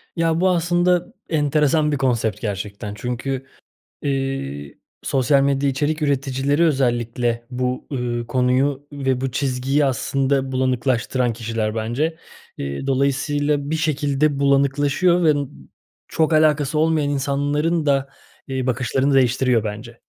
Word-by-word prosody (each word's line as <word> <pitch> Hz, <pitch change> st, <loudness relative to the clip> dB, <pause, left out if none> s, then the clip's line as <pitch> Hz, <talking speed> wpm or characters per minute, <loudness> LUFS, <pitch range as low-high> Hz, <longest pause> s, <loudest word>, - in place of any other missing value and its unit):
Ya, 165 Hz, 0 st, +1 dB
bu 185 Hz, -, +4 dB
aslında 175 Hz, +4 st, +1 dB, 0.2 s
enteresan 150 Hz, 0 st, +2 dB
bir 145 Hz, -, 0 dB
konsept 115 Hz, -6 st, 0 dB
gerçekten 105 Hz, 0 st, -4 dB
çünkü, 125 Hz, +4 st, -4 dB, 0.6 s
iii, 135 Hz, -, -3 dB, 0.2 s
sosyal 135 Hz, +1 st, +2 dB
medya 140 Hz, 0 st, +1 dB
içerik 150 Hz, +3 st, -1 dB
üreticileri 140 Hz, +2 st, +1 dB
özellikle 120 Hz, -4 st, 0 dB
bu, 125 Hz, 0 st, -2 dB
ııı, 120 Hz, -2 st, -2 dB
konuyu 130 Hz, +3 st, +1 dB
ve 135 Hz, -3 st, -1 dB
bu 135 Hz, 0 st, -2 dB
çizgiyi 135 Hz, +1 st, 0 dB
aslında 135 Hz, 0 st, 0 dB
bulanıklaştıran 130 Hz, -1 st, 0 dB
kişiler 115 Hz, -1 st, -3 dB
bence. 120 Hz, +9 st, -1 dB, 0.4 s
İii, 70 Hz, -, -4 dB
dolayısıyla 140 Hz, +2 st, 0 dB
bir 160 Hz, -, +1 dB
şekilde 145 Hz, -2 st, 0 dB
bulanıklaşıyor 140 Hz, +6 st, +2 dB
ve, 155 Hz, -, +6 dB
ımm, 135 Hz, -, -4 dB, 0.4 s
çok 160 Hz, 0 st, +1 dB
alakası 155 Hz, -1 st, +3 dB
olmayan 155 Hz, -2 st, +2 dB
insanların 145 Hz, +4 st, 0 dB
da, 135 Hz, -1 st, +2 dB, 0.4 s
iii, 130 Hz, -1 st, -2 dB
bakışlarını 130 Hz, +2 st, 0 dB
değiştiriyor 125 Hz, -3 st, +3 dB
bence. 110 Hz, +3 st, -7 dB
135 Hz, 120 wpm, -21 LUFS, 125-145 Hz, 0.6 s, ve